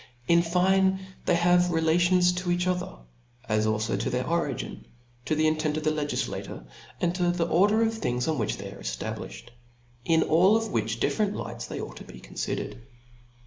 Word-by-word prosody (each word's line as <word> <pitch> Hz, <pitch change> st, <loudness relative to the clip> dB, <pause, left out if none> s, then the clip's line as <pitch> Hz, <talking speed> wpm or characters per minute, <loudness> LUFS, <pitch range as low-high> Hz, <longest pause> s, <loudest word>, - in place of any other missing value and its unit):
In 170 Hz, 0 st, +5 dB
fine, 190 Hz, +2 st, +2 dB, 0.3 s
they -, -, +4 dB
have 175 Hz, +1 st, +4 dB
relations 175 Hz, +2 st, +3 dB
to 180 Hz, 0 st, -3 dB
each 175 Hz, 0 st, +1 dB
other, 180 Hz, -, -2 dB, 0.5 s
as 110 Hz, 0 st, +1 dB
alfo 110 Hz, -2 st, 0 dB
to 115 Hz, -, -1 dB
their 125 Hz, +1 st, -1 dB
origin, 165 Hz, -6 st, -2 dB, 0.4 s
to 155 Hz, -, 0 dB
the 155 Hz, +1 st, +2 dB
intent 155 Hz, -1 st, +1 dB
of 155 Hz, -, -3 dB
the 155 Hz, -, +2 dB
legiQator, 145 Hz, -, -3 dB, 0.3 s
and 175 Hz, -1 st, +1 dB
to 180 Hz, -1 st, +1 dB
the 175 Hz, -1 st, +1 dB
order 205 Hz, +7 st, +3 dB
of 225 Hz, 0 st, +1 dB
things 125 Hz, -, -2 dB
on 155 Hz, -4 st, 0 dB
which 110 Hz, -, -1 dB
they -, -, -7 dB
are -, -, -12 dB
efta -, -, -4 dB
blifhed; -, -, -9 dB, 0.5 s
in 160 Hz, +5 st, +3 dB
all 185 Hz, +7 st, +4 dB
which 115 Hz, -, -1 dB
different 210 Hz, -, 0 dB
lights -, -, -6 dB
they -, -, -5 dB
ought -, -, -7 dB
to -, -, -9 dB
be 65 Hz, -, -12 dB
confidered. -, -, -4 dB
170 Hz, 185 wpm, -27 LUFS, 145-180 Hz, 0.5 s, In